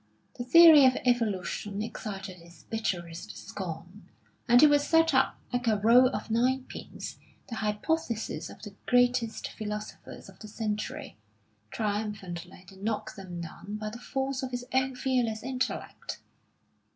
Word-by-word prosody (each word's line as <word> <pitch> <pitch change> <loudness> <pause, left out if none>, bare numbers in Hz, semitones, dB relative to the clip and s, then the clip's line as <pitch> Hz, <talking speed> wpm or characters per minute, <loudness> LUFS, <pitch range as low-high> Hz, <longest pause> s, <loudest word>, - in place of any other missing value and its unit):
The - - -1
theory 320 +2 +9
of 255 - +2
Evolution 210 -3 0
excited 195 -4 -6
his 170 -2 -17
bitterest 175 -6 -4
scorn, 180 +1 -7 0.4
and 240 0 +7
he 305 - +9
would 290 -1 +5
set 325 +1 +3
up, 265 0 +3 0.2
like 245 0 -1
a 215 -2 +4
row 235 +5 +6
of 220 -3 -4
nine 255 +3 +2
pins, - - -8 0.3
the 230 - -5
hypotheses 225 +3 -2
of - - -12
the 205 -2 -8
greatest 245 -2 +2
philosophers 210 0 -7
of - - -15
the 215 - -9
century, 210 - -4 0.5
triumphantly 200 - -4
to 195 0 -14
knock 220 0 -2
them 180 -3 -7
down 195 +5 -7
by 215 0 -4
the 235 - -8
force 265 +1 -2
of 260 - -3
his 245 -1 -4
own 260 0 +1
fearless 250 -4 0
intellect. 255 0 -3
220 Hz, 145 wpm, -29 LUFS, 200-255 Hz, 0.5 s, theory